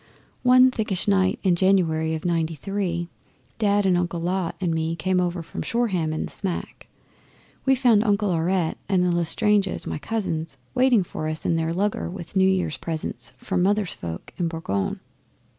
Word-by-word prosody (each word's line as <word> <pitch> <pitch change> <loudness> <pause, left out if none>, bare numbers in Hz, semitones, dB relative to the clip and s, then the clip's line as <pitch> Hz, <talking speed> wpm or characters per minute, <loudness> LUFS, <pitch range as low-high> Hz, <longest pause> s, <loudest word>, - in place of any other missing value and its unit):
One 255 +1 +6
thickish 210 -6 -1
night 190 -2 +3
in 185 -3 +3
January 165 -4 +2
of 160 - -6
'Ninety 165 -2 0
three, 175 +1 -2 0.5
Dad 205 -2 +2
and 185 -2 +4
Uncle 175 -1 -1
Lot 180 +1 -1
and 175 -3 0
me 160 0 -1
came 180 +3 +1
over 175 -1 -2
from - - -6
Shoreham 195 -10 0
in 155 - -2
the - - -9
smack, 190 -4 -4 0.6
and - - -35
we 265 - +6
found 240 -5 +4
Uncle 205 -2 +1
Aurette 170 0 0
and 185 -2 +3
the 180 - +2
L'Estranges, 195 +4 +1
my - - -4
cousins, 165 -8 -3 0.2
waiting 250 -5 +4
for 155 -2 -5
us 155 0 -3
in 165 - +2
their 165 0 0
lugger 195 +3 -1
with 175 0 -9
New 190 0 +5
Year's 185 -5 0
presents 160 -2 -5
from 185 -1 -1
Mother's 200 0 +1
folk 85 -1 -7
in 175 -3 0
Boulogne. 160 - -2
180 Hz, 175 wpm, -24 LUFS, 165-200 Hz, 0.6 s, One